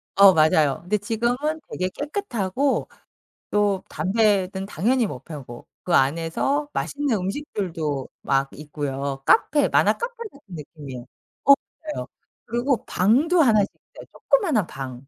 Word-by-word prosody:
어 200 -1 +8
맞아요. 155 -3 +3
근데 195 +5 0
지금은 225 +4 -1 0.4
되게 185 0 -2
깨끗하고 275 - -2 0.6
또 205 -2 +1
담배는 190 +1 +1
당연히 230 +6 +1
못 - - -8
펴고 130 -7 -9 0.2
그 180 - -2
안에서 165 - +1
맛있는 285 -4 -1
음식들도 180 - -3
막 135 0 +1
있고요. 140 -2 -4
카페 295 - +4
만화 - - +4
카페 475 +1 -4 0.2
같은 280 - -18
느낌이에요. 140 -5 -9 0.4
어 280 - +9 0.4
맞아요. - - -5 0.4
그리고 245 +2 -1
방도 285 - +3
1 225 -7 +5
씩 195 - -1 0.3
있어요 - - -10
조그마한 315 - +1
방. 130 -1 -8
195 Hz, 285 characters per minute, -23 LUFS, 150-245 Hz, 0.6 s, 어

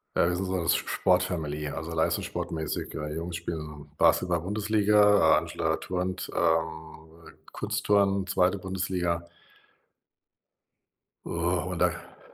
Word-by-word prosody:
Äh, - - +4
wir 90 - 0
sind 95 +2 -2
so 95 - -2
'ne 85 - -2
S - - +4
Sport-Family, 85 -5 0
also 80 +3 -6
leistungssportmäßig. 80 0 -2
Äh, 75 0 -4
Jungs 85 +1 -4
spielen 75 -3 -7
Basketball-Bundesliga, 105 +3 +4
Angela 80 -1 -1
turnt, 90 0 -3
ähm, 80 0 -2 0.2
Kunstturnen, 100 -1 +1
2. 95 +1 +2
Bundesliga. 90 -2 -2 2.0
Oh, 85 +2 -1
und 90 - -4
dann 90 -1 -1
85 Hz, 105 wpm, -27 LUFS, 80-95 Hz, 2.0 s, Äh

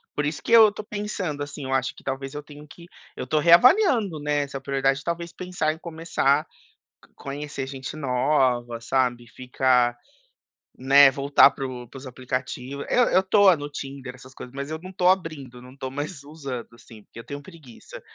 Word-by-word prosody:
Por 150 - -1
isso 145 -2 -3
que - - -5
eu 225 -2 +8
tô 210 - -8
pensando, 205 -8 -4
assim, 145 0 -6
eu 130 0 -3
acho 130 0 -1
que - - -16
talvez 135 +1 -5
eu 150 0 -6
tenho 150 0 -13
que 170 +3 -14 0.3
eu - - -5
tô 150 +4 +1
reavaliando, 220 - +5
né, 145 0 0
essa 140 -1 -5
prioridade. 135 +1 0
Talvez 170 0 -4
pensar 180 -4 -2
em 160 - -8
começar 160 -3 0 0.7
conhecer 140 -1 -6
gente 135 +2 -7
nova, 125 -3 0
sabe, 120 0 -1
ficar, 125 0 +1 0.8
né, 135 +1 +6
voltar 140 +1 +5
para 135 0 -6
o 125 -1 -8
para 135 - -12
os 135 0 -10
aplicativo. 130 +2 -5
Eu 245 - +4
eu 185 - +4
tô 195 -2 +5
no 145 -1 -7
Tinder, 135 -3 -8
essas 130 +1 -15
coisas, 125 -1 -11
mas 140 +2 -5
eu 160 - -4
não 185 +1 -9
tô 180 -1 0
abrindo, 150 -9 -2
não 125 +2 -15
tô 130 -1 -6
mais 145 +1 -6
usando, 140 -6 -7
assim, 110 -2 -16
porque - - -14
eu 115 - -9
tenho 145 0 -7
preguiça. 155 -8 -13
140 Hz, 190 wpm, -24 LUFS, 130-160 Hz, 0.8 s, eu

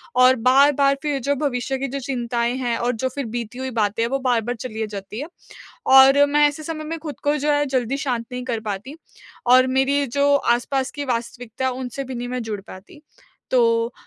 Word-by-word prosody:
और 255 +1 +6
बार-बार 275 +1 +4
फिर 290 -2 -1
जो 285 +3 0
भविष्य 265 -2 -2
की 275 +1 -3
जो 275 +2 -4
चिंताएँ 240 -2 -2
हैं 240 -3 -1
और 245 +1 0
जो 260 +4 -2
फिर 280 -3 -3
बीती 235 +1 -5
हुई 260 0 -4
बातें 220 0 0
हैं 230 - -1
वो 275 0 -1
बार-बार 245 -2 0
चली 220 -1 -5
आ - - -1
जाती 205 +1 -7
है। 300 - -5 0.6
और 270 +2 +7
मैं 295 +1 +4
ऐसे 295 +2 -7
समय 310 0 -5
में 325 +1 -4
खुद 295 -4 -8
को 295 +1 +2
जो 295 +2 0
है 290 0 +2
जल्दी 260 0 -1
शांत 245 -4 -2
नहीं 250 0 -4
कर 235 -3 -2
पाती 215 +6 -5 0.5
और 255 +1 +6
मेरी 270 +2 +1
जो 280 +3 +2
आस-पास 260 +2 0
की 290 -1 -5
वास्तविकता 240 0 -4
है, 260 - 0
उनसे 260 +1 -5
भी 260 0 -7
नहीं 245 0 -5
मैं 250 -1 -3
जुड़ 215 -3 -5
पाती। 205 +9 -14 0.5
तो, 230 -1 +2
255 Hz, 215 wpm, -22 LUFS, 235-275 Hz, 0.6 s, और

